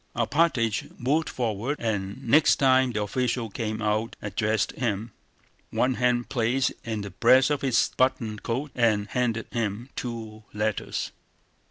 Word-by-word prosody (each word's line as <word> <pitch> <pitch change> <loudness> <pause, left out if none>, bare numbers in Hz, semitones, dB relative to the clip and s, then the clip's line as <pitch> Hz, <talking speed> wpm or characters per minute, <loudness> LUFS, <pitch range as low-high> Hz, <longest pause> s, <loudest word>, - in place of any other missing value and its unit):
Alpátych 120 -2 +1
moved 145 +6 +1
forward 120 +4 -2
and 105 -2 -3
next 150 +6 +5
time 130 -2 +4
the 105 -2 -1
official 120 +1 -1
came 110 +1 -3
out 110 +2 0
addressed 105 0 0
him, 115 -2 -2 0.6
one 130 +1 +1
hand 125 -1 +1
placed 125 +2 +1
in 110 -2 -3
the 100 -1 -6
breast 130 - +5
of 145 - 0
his 130 -4 +2
buttoned 115 -5 +1
coat, 135 +5 -3
and 110 -4 +2
handed 115 -3 0
him 115 +2 -2
two 110 -3 -6
letters. 105 0 -2
115 Hz, 140 wpm, -26 LUFS, 110-130 Hz, 0.6 s, next